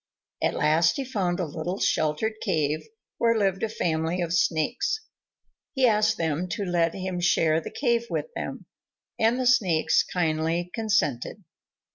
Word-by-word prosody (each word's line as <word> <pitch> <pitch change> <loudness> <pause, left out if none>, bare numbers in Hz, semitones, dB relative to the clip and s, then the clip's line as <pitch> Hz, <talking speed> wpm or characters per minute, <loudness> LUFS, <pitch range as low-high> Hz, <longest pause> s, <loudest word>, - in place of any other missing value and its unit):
At - - +1
last 160 +2 +3
he 275 - -2
found 195 -8 -1
a 180 - 0
little 160 +5 -4
sheltered 155 +8 +1
cave, 155 -6 -1 0.3
where 230 -1 +3
lived 195 -3 +1
a 225 - 0
family 165 -3 -1
of 170 -1 -1
Snakes. 180 - +1 0.7
He 265 -2 +3
asked 215 -1 +3
them 165 +2 -1
to 210 -2 -3
let 170 -2 +1
him 185 -1 -3
share 165 -2 +2
the - - -7
cave 235 -3 0
with 485 - -3
them, - - -5 0.5
and 230 +3 +2
the 255 - 0
Snakes 180 -10 +3
kindly 165 0 -1
consented. 200 - -1
180 Hz, 150 wpm, -26 LUFS, 160-220 Hz, 0.7 s, last